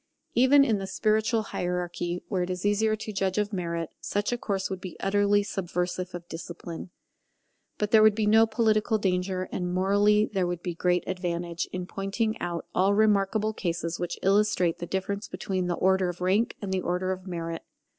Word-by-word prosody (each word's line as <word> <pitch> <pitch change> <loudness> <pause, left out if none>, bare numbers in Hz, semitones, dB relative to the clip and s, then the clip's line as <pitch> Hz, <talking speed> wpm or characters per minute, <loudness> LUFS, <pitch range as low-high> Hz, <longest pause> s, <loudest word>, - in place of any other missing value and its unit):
Even 275 +3 +6
in 220 -5 +1
the 195 - -4
spiritual 220 +3 +1
hierarchy, 175 0 -2
where 190 -4 -1
it 180 - -2
is 180 +1 -3
easier 215 +1 +2
to 215 0 -7
judge 190 -1 -1
of 210 0 0
merit, 170 -3 -3
such 205 +2 -1
a 245 - 0
course 195 -4 -1
would 190 -1 -5
be 185 -3 -8
utterly 205 +1 +2
subversive 180 -2 -3
of 175 -1 -8
discipline. 170 +1 -7 0.9
But 210 0 -1
there 220 -2 +7
would 215 -1 +6
be 215 -1 0
no 220 +2 +6
political 220 -1 +2
danger, 185 -1 -1
and 180 -1 -2
morally 205 +3 +3
there 190 -4 -1
would 175 -1 -4
be 175 - -2
great 180 +1 +1
advantage, 175 -2 -3
in 180 -1 -4
pointing 200 +4 -2
out 175 -1 -3
all 195 +2 +3
remarkable 215 0 +2
cases 170 -3 -3
which 175 -1 -3
illustrate 195 -3 +2
the 175 - -5
difference 200 +3 -3
between 185 -3 -3
the 175 - 0
order 190 0 +2
of 175 - -6
rank 190 +6 +1
and 190 -1 -2
the 185 - 0
order 180 +1 -1
of 185 0 -5
merit. 165 -2 -4
190 Hz, 185 wpm, -27 LUFS, 180-210 Hz, 0.9 s, there